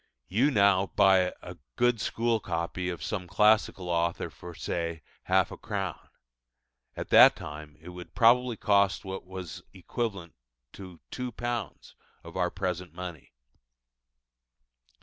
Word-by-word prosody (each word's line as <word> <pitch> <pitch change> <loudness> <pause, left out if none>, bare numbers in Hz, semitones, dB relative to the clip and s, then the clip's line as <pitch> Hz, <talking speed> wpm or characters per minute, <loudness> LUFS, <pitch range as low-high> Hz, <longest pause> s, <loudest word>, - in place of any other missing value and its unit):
You 120 +10 +2
now 100 -5 +4
buy 95 -2 +5
a 90 0 -9 0.2
good 120 -3 +2
school 115 -1 0
copy 90 0 -3
of 85 - -5
some 95 -4 -3
classical 105 -1 +3
author 85 0 -1
for, 90 -1 -11
say, 85 -1 -3 0.2
half - - +2
a - - -8
crown: - - -5 0.9
at - - -5
that - - +8
time 75 0 -9
it 80 - -11
would 90 0 -11
probably 120 0 +4
cost 100 -2 +2
what 95 -1 -6
was 95 -4 -7
equivalent 95 -2 -4 0.4
to 90 -4 -11
£2 120 -3 -5 0.3
of 85 - -11
our 90 -1 +1
present 90 -2 -4
money. 85 -8 -8
95 Hz, 130 wpm, -28 LUFS, 85-105 Hz, 0.9 s, that